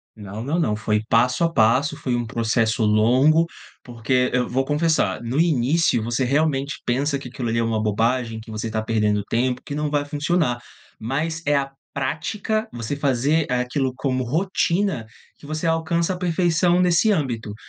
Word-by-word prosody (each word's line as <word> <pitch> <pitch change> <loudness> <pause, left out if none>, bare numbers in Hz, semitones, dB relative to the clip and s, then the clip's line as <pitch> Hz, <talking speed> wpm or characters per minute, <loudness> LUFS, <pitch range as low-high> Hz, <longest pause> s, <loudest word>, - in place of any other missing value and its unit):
Não, 105 0 -7
não, 145 +6 -1
não, 110 -11 +1
foi 105 0 -1
passo 125 +6 +2
a 165 0 +1
passo, 125 +6 +3
foi 130 -4 -2
um 120 0 -1
processo 115 +1 0
longo. 125 +10 +4 0.4
Porque 125 +1 0
eu 125 0 +1
vou 135 +2 0
confessar 150 - +1
no 120 +5 -2
início 155 -4 +2
você 120 +3 -1
realmente 140 -1 0
pensa 140 +3 0
que 130 - -9
aquilo 120 -1 -4
ali 115 +1 0
é - - +1
uma 115 -1 0
bobagem, 115 +2 0
que 110 +1 -13
você 110 +1 -4
está 110 0 -2
perdendo 105 -2 +1
tempo, 125 +2 0
que 145 - -6
não 150 0 -1
vai 145 -1 +1
funcionar. 145 -3 0 0.4
Mas 155 +8 -2
é 145 0 +2
a 135 -1 0 0.2
prática, 190 +11 -2
você 120 +3 -4
fazer 140 +2 +1
aquilo 125 +1 -1
como 130 -1 -1
rotina, 170 - 0 0.3
que - - -15
você 155 +2 -3
alcança 165 +2 0
a - - -5
perfeição 175 0 +2
nesse 180 +4 +3
âmbito. 120 - -2
130 Hz, 175 wpm, -22 LUFS, 115-155 Hz, 0.4 s, longo